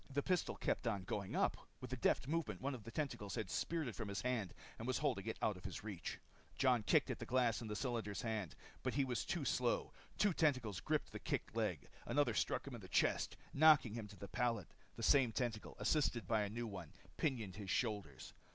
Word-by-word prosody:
The 140 +1 0
pistol 180 -1 +1
kept - - -1
on 100 -4 0
going 100 +1 -3
up. - - +3 0.2
With 130 0 -6
a - - +1
deft 130 - +2
movement, 165 +2 -1
one 140 +2 -1
of 120 -4 -7
the - - -6
tentacles 115 -8 -3
had 110 - -3
speared 165 -4 0
it 115 - -3
from 110 -1 -4
his 100 -1 -3
hand 120 -8 0 0.3
and 115 - -4
was 130 - +1
holding 125 -9 0
it 110 - -2
out 105 - +2
of 90 - -13
his 95 -1 -5
reach. 105 -5 -4 0.4
Jon 125 -4 +4
kicked 105 - +3
at - - -4
the - - -4
glass 120 -2 +2
in 115 - -5
the 105 - -3
cylinder's 115 -4 -2
hand. 110 -7 -2 0.3
But 130 - -1
he 140 -1 +3
was 125 -2 -1
too 165 -5 -2
slow. 125 -2 +1 0.2
Two 205 -1 +4
tentacles 130 - +2
gripped - - 0
the - - -5
kicking - - -2
leg. - - -1 0.2
Another - - +3
struck - - 0
him - - -7
in - - -6
the - - -9
chest, - - +2 0.2
knocking 145 -6 +7
him 110 -2 -4
to 105 - -12
the 100 - -7
pallet. 115 -3 -1 0.2
The - - -6
same 135 -5 +5
tentacle, 115 -3 -2
assisted 120 +1 +2
by 110 -2 +3
a 105 - -1
new 120 +3 -3
one, 95 -7 -7 0.2
pinioned 115 - -1
his 100 -3 -6
shoulders. 100 - -1
115 Hz, 225 wpm, -39 LUFS, 105-130 Hz, 0.4 s, knocking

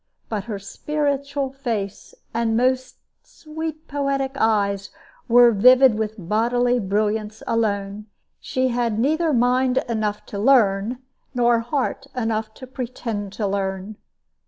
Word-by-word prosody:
But 210 -3 -3
her 215 -3 -4
spiritual 280 +5 -2
face 230 -8 -4 0.2
and 225 -1 +1
most 255 +1 +1 0.3
sweet 315 0 -7
poetic 275 -2 -1
eyes 200 -5 +1 0.4
were 240 0 +7
vivid 250 +4 +6
with 215 0 -2
bodily 240 +6 +1
brilliance 210 +1 -1
alone. 205 -2 -1 0.3
She 260 0 -1
had 235 -3 0
neither 310 +7 +1
mind 250 0 +2
enough 215 -3 -2
to 200 - -6
learn, 230 0 +3 0.3
nor 240 -1 +3
heart 270 +3 -2
enough 225 -2 -1
to 260 - -10
pretend 235 -5 -5
to 210 - -2
learn. 195 +1 -3
235 Hz, 120 wpm, -22 LUFS, 210-260 Hz, 0.4 s, were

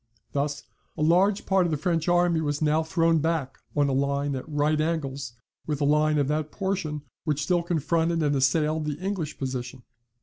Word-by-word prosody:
Thus 145 +1 -2 0.3
a - - 0
large 190 +6 +3
part 190 -2 +3
of - - -2
the 155 - 0
French 165 +1 0
army 175 -2 +3
was 145 -1 -1
now 155 +1 +2
thrown 165 0 +2
back 160 -4 -1 0.2
on 145 -1 +3
a - - 0
line 140 +1 0
at 130 +4 -6
right 150 +1 +1
angles 140 -6 -2 0.3
with 150 -2 -1
the 145 - 0
line 150 +1 +3
of 140 -2 +2
that 155 0 -1
portion 185 -7 -2 0.2
which 150 -3 -1
still 175 +2 +2
confronted 165 0 0
and 145 -1 +2
assailed 150 +3 +1
the 150 -1 -3
English 185 -4 -3
position. 130 -1 -5
155 Hz, 190 wpm, -26 LUFS, 145-165 Hz, 0.3 s, large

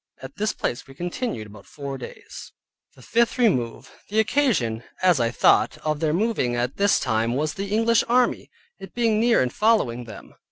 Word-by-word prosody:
At 130 +6 -10
this 215 +1 0
place 120 - -4
we 135 - -14
continued 175 - -4
about 105 -1 -14
four 140 -2 -6
days. - - -10 0.4
THE 130 - -17
FIFTH 235 - +1
REMOVE 130 - 0 0.2
The 215 +2 +1
occasion 210 - +1 0.2
(as 180 -6 +4
I 115 -1 +2
thought) 120 - +3
of 155 -1 0
their 155 -1 +1
moving 175 - 0
at 120 +2 -2
this 200 0 +3
time 115 -1 0
was 155 +3 -1
the 195 0 -5
English 225 +2 +3
army, 245 +1 +2 0.3
it - - -11
being 230 -3 +2
near 230 - +3
and 125 - -3
following 140 - +1
them. 110 - -12
155 Hz, 185 wpm, -23 LUFS, -, 0.4 s, as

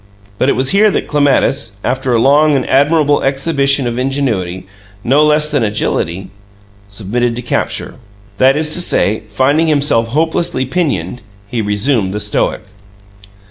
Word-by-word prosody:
But 130 - +2
it - - +3
was 130 +1 0
here 210 +2 +4
that - - -2
Clematis, 140 -4 +1
after 130 +1 -1
a 120 - +3
long 145 +4 +3
and 135 - -1
admirable 145 +1 +2
exhibition 140 0 +1
of 120 +1 -3
ingenuity, 110 -10 -2 0.4
no 140 +5 +3
less 150 0 +2
than 145 -3 0
agility, 95 -4 -2 0.6
submitted 115 +4 -2
to 125 - -6
capture. 120 - -2 0.4
That 135 +1 +4
is 155 0 +1
to 175 - +1
say, 110 - 0
finding 140 +9 +1
himself 145 -6 +1
hopelessly 160 +1 -1
pinioned, 125 - -2 0.3
he 115 +2 -3
resumed 105 -1 0
the - - -2
stoic. 105 +1 -1
135 Hz, 145 wpm, -14 LUFS, 115-145 Hz, 0.6 s, here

